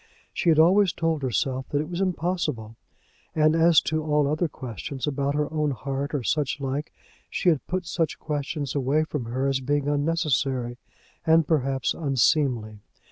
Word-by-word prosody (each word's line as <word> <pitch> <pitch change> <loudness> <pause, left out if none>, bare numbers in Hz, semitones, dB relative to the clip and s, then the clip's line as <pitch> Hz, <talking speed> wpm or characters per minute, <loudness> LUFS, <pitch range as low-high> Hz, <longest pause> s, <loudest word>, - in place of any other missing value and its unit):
She 175 - +1
had 160 - +5
always 185 +3 +5
told 165 -2 -1
herself 130 +1 -1
that 145 - 0
it 150 - -2
was 175 +2 -4
impossible; 165 - -2 0.6
and 155 0 +4
as 165 -1 +6
to 155 -1 -1
all 150 -1 +2
other 155 +4 0
questions, 130 - -6
about 140 -1 -1
her 150 0 +1
own 150 -1 +1
heart 140 +2 -3
or 135 - -2
such 145 +1 0
like, 140 +2 -3 0.4
she 180 - +1
had 155 -5 0
put 185 0 -2
such 165 -1 -1
questions 145 -2 -3
away 140 +2 +1
from 150 -5 -4
her 130 +4 -2
as 135 -1 +1
being 145 +2 -1
unnecessary, 145 -5 0 0.4
and, 160 -2 +4
perhaps, 135 -5 +1
unseemly. 130 -6 +1
145 Hz, 165 wpm, -25 LUFS, 135-160 Hz, 0.6 s, as